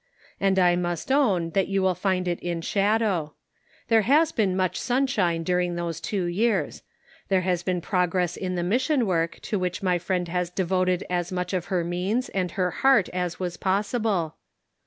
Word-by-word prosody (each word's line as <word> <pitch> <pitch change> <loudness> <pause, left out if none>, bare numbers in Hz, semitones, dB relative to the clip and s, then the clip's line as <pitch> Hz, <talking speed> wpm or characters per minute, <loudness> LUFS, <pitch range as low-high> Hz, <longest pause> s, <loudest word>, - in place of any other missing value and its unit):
And 195 -1 +2
I 180 -2 +4
must 175 +5 -2
own 200 -12 +2
that 195 +2 +1
you 195 -1 0
will 190 -1 +3
find 185 -1 -1
it 175 -1 -1
in 170 -1 -3
shadow. 200 -5 0 0.5
There 225 -1 +4
has 300 +8 +3
been 195 -8 0
much 185 -1 0
sunshine 225 -10 +1
during 180 0 0
those 170 -2 -4
two 195 -4 -2
years. 200 +4 0 0.5
There 190 -2 +3
has 180 -1 0
been 180 0 -1
prog 180 -1 0
ress 180 -2 +1
in 185 -1 -3
the 175 - -1
mission 255 - +1
work 165 -4 -1
to 210 - -2
which 185 +1 -3
my 180 -2 +2
friend 180 0 -1
has 180 0 -1
devoted 185 0 0
as 175 -1 -2
much 180 +1 -3
of 180 -2 -1
her 180 -3 -1
means 185 +8 -1
and 185 -2 -1
her 180 -2 0
heart 265 -8 +3
as 180 -1 -3
was 175 -2 -3
possible. 200 -3 0
185 Hz, 185 wpm, -25 LUFS, 175-200 Hz, 0.5 s, I